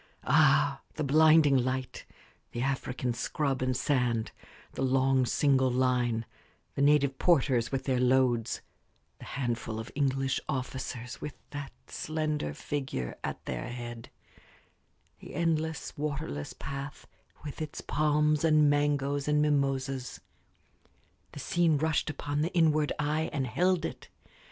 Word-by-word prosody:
Ah, - - +4
the 155 - -2
blinding 155 0 +5
light 130 0 -1 0.5
the 120 - -3
African 130 -2 -1
scrub 135 +2 -1
and 130 -1 0
sand 125 -6 0 0.4
the - - -5
long, 130 -1 +3
single 130 0 +3
line 125 -2 +1 0.5
the - - -2
native 140 -2 +3
porters 135 -8 +3
with 135 -1 -1
their 130 -2 0
loads 125 -2 +2 0.6
the - - -10
handful 120 -4 -3
of 115 +2 -7
English 135 -1 0
officers 130 -3 -4
with 150 - -6 0.2
that 145 -2 -6
slender 155 - -2
figure 130 - -4
at - - -5
their - - -4
head 120 -1 -7 1.1
the - - -10
endless, 160 -2 -1
waterless 145 - -4
path 140 +1 -7 0.4
with 145 +1 -6
its 155 -2 -5
palms 150 0 +1
and 155 -2 +5
mangoes 145 -1 0
and 150 0 +3
mimosas 135 -3 0 1.1
the - - -8
scene 170 -3 +2
rushed 160 +1 0
upon 145 0 -2
the 165 +4 0
inward 155 -3 +3
eye 150 +2 0
and 135 -3 -1
held 180 +8 +1
it. - - -7
140 Hz, 125 wpm, -29 LUFS, 125-150 Hz, 1.1 s, blinding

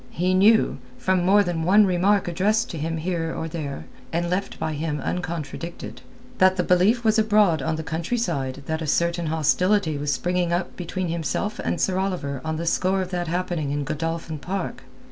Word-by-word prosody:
He 180 +2 0
knew—from 185 - +2
more 200 +3 +5
than 175 -3 -2
one 200 +5 +5
remark 190 +2 +2
addressed 205 +6 +1
him 165 0 -3
here 165 0 -2
or 160 - -3
there, 150 -4 -5 0.3
and 170 +1 -1
left 195 +2 -2
by 155 - -2
him 150 0 -2
uncontradicted—that 180 - -2
the 180 - 0
belief 195 +8 +3
was 220 0 +3
abroad 210 -7 +3
on 160 +4 -1
the 160 - -4
countryside 160 - -2
that 160 +2 -2
a 160 - -3
certain 170 +2 +1
hostility 160 +1 +2
was 145 0 -1
springing 175 +5 0
up 175 +1 -1
between 180 0 -3
himself 170 - -2
and - - -1
Sir 190 -1 +1
Oliver 175 -9 -2
on 160 0 -2
the 170 - -3
score 185 +3 +1
of 185 - -8
that 175 -1 -2
happening 175 -3 -2
in 145 0 -1
Godolphin 165 +1 -3
Park. 175 -6 -4
175 Hz, 175 wpm, -24 LUFS, 160-190 Hz, 0.3 s, more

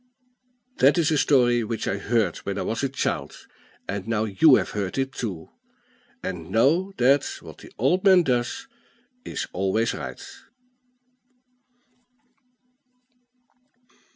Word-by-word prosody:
That - - +4
is 165 -2 +2
a 155 - +2
story 120 -5 +3
which 110 +1 -4
I 100 - -1
heard 105 -4 0
when 100 - -5
I - - -2
was 115 - -2
a 135 - 0
child; 135 - -3 0.4
and 100 0 -4
now 115 -2 0
you 110 +8 +5
have - - 0
heard 100 0 -3
it 135 0 -1
too, 95 -11 -6 0.7
and 90 -4 -5
know 160 +12 +2
that 135 +3 +4 0.2
"What - - -12
the - - -14
old 155 - +1
man 190 -3 +6
does 125 - -1 0.6
is - - -4
always 95 +5 0
right." - - -7
120 Hz, 125 wpm, -24 LUFS, 100-140 Hz, 0.7 s, man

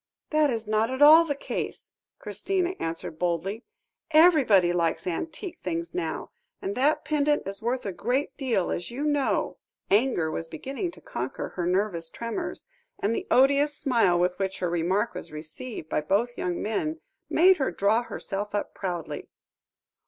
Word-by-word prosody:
"That 305 -1 +4
is 230 -3 -2
not 215 +1 +2
at 260 +2 +2
all 315 +3 +9
the 290 -3 -1
case," - - -5 0.3
Christina 360 - -1
answered 165 -1 -4
boldly; 180 +6 -1 0.4
"everybody 290 - +6
likes 170 -2 0
antique 320 - -4
things 170 -1 -3
now; 165 -3 -3 0.3
and 195 - -3
that 280 +7 +2
pendant 295 -1 +1
is 195 +2 -5
worth 245 +3 -1
a 200 - -1
great 255 +9 -1
deal, 245 -10 0
as 175 - -3
you 250 +5 -4
know." 290 -2 0 0.3
Anger 200 -7 +3
was 165 +1 -4
beginning 270 - -4
to - - -14
conquer - - -4
her 175 -2 -3
nervous 180 -3 0
tremors, 230 +4 -5 0.3
and 215 +3 0
the - - -4
odious 280 +3 +4
smile 230 -10 +3
with 180 +1 +1
which 190 -1 -1
her 180 -2 -1
remark 180 +6 +1
was 180 - -7
received 155 +6 -7
by 150 - 0
both 215 +10 0
young 180 -6 -2
men, 310 +10 -2 0.3
made 370 +3 +6
her 270 - 0
draw 200 +6 +2
herself 205 -3 -5
up 205 - -2
proudly. 175 -4 -5
215 Hz, 160 wpm, -27 LUFS, 180-280 Hz, 0.4 s, all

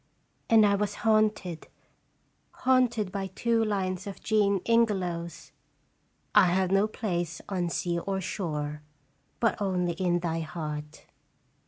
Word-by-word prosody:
And 220 -2 +7
I 200 - +4
was 205 0 -1
haunted 215 -6 +1 0.8
haunted 245 -6 +1
by 195 0 -3
two 225 +4 0
lines 190 -2 -2
of 200 - -7
Jean 205 -3 +2
Ingelow's 180 -8 0 0.8
"I - - +7
have 185 +1 +1
no 195 +2 +4
place 175 -7 -3
on 180 -3 -1
sea 170 0 -1
or 195 +2 -2
shore, 150 -6 -3 0.6
But 230 -2 +1
only 180 -3 0
in 175 0 0
thy 165 -1 -1
heart." 155 -1 -6
190 Hz, 125 wpm, -28 LUFS, 170-210 Hz, 0.8 s, And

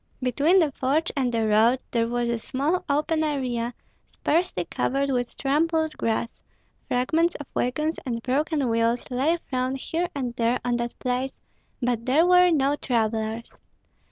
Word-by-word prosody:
Between 280 +8 +3
the 320 -6 +3
forge 280 +5 0
and 260 -3 0
the 225 -2 0
road 220 +4 +4
there 230 -1 +1
was 240 0 -1
a 235 -1 -1
small 285 +10 -1
open 310 +2 +1
area, 250 -5 -2 0.3
sparsely 325 - 0
covered 275 +8 -1
with 245 -2 -2
trampled 315 +3 +1
grass; 230 +1 0 0.6
fragments 320 +8 +1
of 290 - -7
wagons 305 +6 -1
and 235 -3 -4
broken 285 +1 0
wheels 230 +1 +1
lay 280 +7 +2
thrown 255 0 0
here 330 +6 -2
and 250 -4 -3
there 235 +2 +1
on 240 -1 +1
that 235 0 -4
place, 255 +1 -2 0.4
but 240 -1 -1
there 295 +6 +4
were 360 0 +6
no 285 -3 +2
travellers. 225 -3 -2
260 Hz, 155 wpm, -25 LUFS, 235-305 Hz, 0.6 s, were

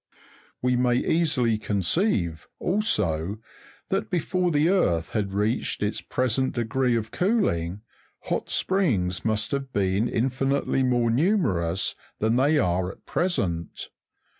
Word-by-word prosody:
We 125 0 +2
may 125 0 +2
easily 130 -6 +1
conceive, 100 - 0
also, 105 - 0 0.5
that 110 - -1
before 180 +1 0
the 150 -1 +2
earth 85 - +1
had 100 -3 -1
reached 105 +3 -1
its 105 +1 -1
pre 130 - -1
sent 130 +3 0
degree 120 +1 +1
of 110 -1 -2
cooling, 105 - 0 0.4
hot - - -3
springs 100 - 0
must 110 -1 0
have 135 -1 -3
been 100 +2 +1
infinitely 135 +3 0
more 120 -2 +2
numerous 105 - +1 0.2
than 110 +2 +1
they 145 +5 +3
are 90 -5 +1
at - - -19
present. 90 - -2
115 Hz, 125 wpm, -25 LUFS, 95-145 Hz, 0.5 s, they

